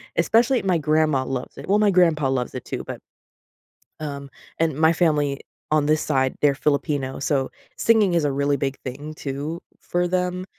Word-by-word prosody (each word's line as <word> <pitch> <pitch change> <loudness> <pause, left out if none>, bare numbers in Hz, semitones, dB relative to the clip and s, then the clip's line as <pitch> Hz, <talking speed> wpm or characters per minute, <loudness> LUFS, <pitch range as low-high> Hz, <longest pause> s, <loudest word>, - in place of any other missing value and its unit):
Especially 240 +3 +3
my 185 -3 +1
grandma 155 -3 +1
loves 130 -1 -5
it - - -9
well, 205 +2 +3
my 210 -1 +4
grandpa 165 -6 +3
loves 125 -2 -2
it - - -5
too, - - -4
but - - -6 1.0
um, 140 -2 -6 0.3
and 160 -3 +1
my 160 +2 +4
family 150 -5 +1 0.3
on 150 -1 +2
this 155 0 +2
side, 130 -3 +1
they're 145 -1 +4
Filipino, 140 -2 -1
so 135 -1 0 0.3
singing 215 -5 +3
is 165 -3 +2
a 145 - +1
really 140 +1 +1
big 135 0 -2
thing 145 +4 -7
too 145 +4 -5 0.2
for 175 0 -1
them, 180 0 -1
150 Hz, 175 wpm, -23 LUFS, 140-175 Hz, 1.0 s, my